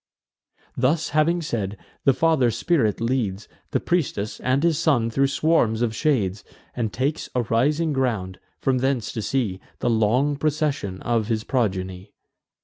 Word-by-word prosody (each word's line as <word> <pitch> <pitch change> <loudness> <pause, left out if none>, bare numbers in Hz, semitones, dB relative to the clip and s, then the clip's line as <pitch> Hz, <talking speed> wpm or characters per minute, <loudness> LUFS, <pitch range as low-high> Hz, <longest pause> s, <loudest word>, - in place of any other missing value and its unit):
Thus 145 +5 +1
having 165 +3 +2
said, 105 -8 -3 0.3
the 135 - +6
father 145 -3 +3
spirit 115 -1 +1
leads 115 -5 -1 0.2
The - - 0
priestess 135 - -1
and 130 +3 +1
his 165 -2 +2
son 120 -9 +2
thro' 135 +4 +2
swarms 135 -6 +2
of 110 -2 -1
shades, 110 - 0 0.3
And 115 -4 -1
takes 140 +5 -2
a 125 - +2
rising 145 +8 +1
ground, 110 -9 -1 0.2
from 130 -1 +1
thence 130 -3 0
to 110 - -4
see 105 -6 -1 0.2
The 120 - 0
long 120 +6 +2
procession 145 -10 -1
of 115 -3 0
his 110 -2 -1
progeny. 95 -6 -2
125 Hz, 145 wpm, -23 LUFS, 110-145 Hz, 0.3 s, the